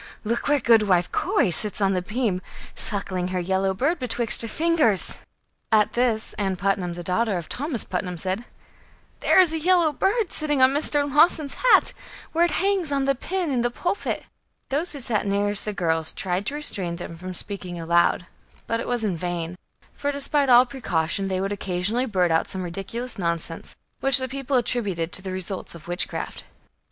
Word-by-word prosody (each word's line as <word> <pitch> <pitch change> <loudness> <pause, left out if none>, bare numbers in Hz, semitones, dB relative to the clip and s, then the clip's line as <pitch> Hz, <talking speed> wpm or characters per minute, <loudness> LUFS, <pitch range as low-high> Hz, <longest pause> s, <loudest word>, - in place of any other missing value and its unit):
look, 230 +2 -2
where 290 0 +3
Goodwife 210 -8 +3
Corey 180 - +1
sits 210 +5 0
on 195 -1 +2
the 180 - 0
beam, 210 -1 -1 0.3
suckling 190 -3 +1
her 185 0 -2
yellow 190 +2 0
bird 305 - 0
betwixt 240 -2 +2
her 230 - -4
fingers!" 305 - +1 0.5
At 215 -1 +3
this, 240 -3 +1
Ann 195 -2 0
Putnam, 190 -2 -1
the 175 0 -7
daughter 195 +3 0
of 170 - -6
Thomas 275 -4 -1
Putnam, 180 -1 -4
said: 190 +6 -2 0.8
"There - - +4
is 350 -4 +5
a 320 - -1
yellow 345 -2 +3
bird 405 - 0
sitting 295 -3 -1
on 260 0 +6
Mr. 290 0 +1
Lawson's 295 0 +3
hat, - - +4 0.4
where 335 +2 +3
it - - 0
hangs 385 -4 0
on 275 -1 +1
the 275 - +3
pin 350 +4 -3
in 250 -3 +1
the 240 - +1
pulpit." 350 +10 -3 0.5
Those 310 +6 0
who 285 - -6
sat 220 -5 0
nearest 200 +1 +1
the 210 - -2
girls 160 -4 -1
tried 185 +1 -2
to 285 - -2
restrain 190 -12 +2
them 170 -1 -7
from 185 +2 -7
speaking 180 -3 -4
aloud; 170 +1 +2 0.4
but 230 - -1
it - - -5
was 245 -2 -1
in 200 -5 0
vain; 175 0 -4 0.4
for, 285 - -2
despite 280 0 0
all 245 0 +7
precaution, 195 -8 -1
they 190 -1 -1
would 195 +1 -2
occasionally 200 +5 -1
blurt 180 -5 +1
out 160 - +2
some 190 -1 -4
ridiculous 205 +7 -4
nonsense, 170 -2 -3 0.2
which 270 -1 +4
the 260 -1 0
people 270 +1 -1
attributed 200 -9 -1
to - - +1
the 190 0 -5
results 185 -1 -5
of 170 - -13
witchcraft. 175 +1 -3
210 Hz, 185 wpm, -24 LUFS, 180-275 Hz, 0.8 s, all